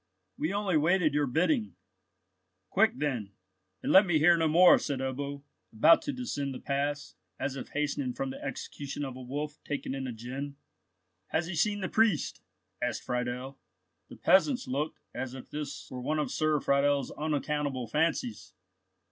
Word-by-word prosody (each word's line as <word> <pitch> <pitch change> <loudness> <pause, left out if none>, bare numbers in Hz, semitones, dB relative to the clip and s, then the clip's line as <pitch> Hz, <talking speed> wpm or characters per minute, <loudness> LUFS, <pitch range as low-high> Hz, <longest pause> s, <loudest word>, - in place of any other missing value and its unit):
We 155 - -1
only 200 -4 +1
waited 160 0 +3
your 145 -1 +2
bidding." 130 - +1 1.0
"Quick 220 0 +4
then, 120 -9 -2 0.5
and - - 0
let 190 - +9
me 175 -5 +2
hear 165 +3 +6
no 165 -1 +2
more," 175 +3 +7
said 140 -3 -2
Ebbo, 140 +2 -4 0.3
about 115 +9 +6
to 295 -2 -3
descend 145 - -3
the - - -6
pass, 145 0 -2 0.3
as 135 0 -2
if 130 - -6
hastening 145 -3 -1
from 135 -1 -2
the - - -9
execution 140 +1 -5
of 130 -2 -6
a 130 - -8
wolf 145 +4 -5
taken 145 -2 -3
in 135 -1 -3
a - - -3
gin. 130 +5 -6 0.7
"Has - - 0
he 175 - -5
seen 205 +5 +1
the 185 - -1
priest?" 220 -8 +1 0.4
asked - - -1
Friedel. 125 +2 -3 0.5
The - - -10
peasants 245 +7 +3
looked 145 +4 -2
as 130 +1 -4
if 130 - -10
this 145 -2 -5
were 125 -1 -5
one 155 +5 -1
of 150 - -1
Sir 155 -1 +2
Friedel's 140 0 +2
unaccountable 150 -3 -1
fancies. 145 -3 -1
145 Hz, 165 wpm, -30 LUFS, 130-160 Hz, 1.0 s, let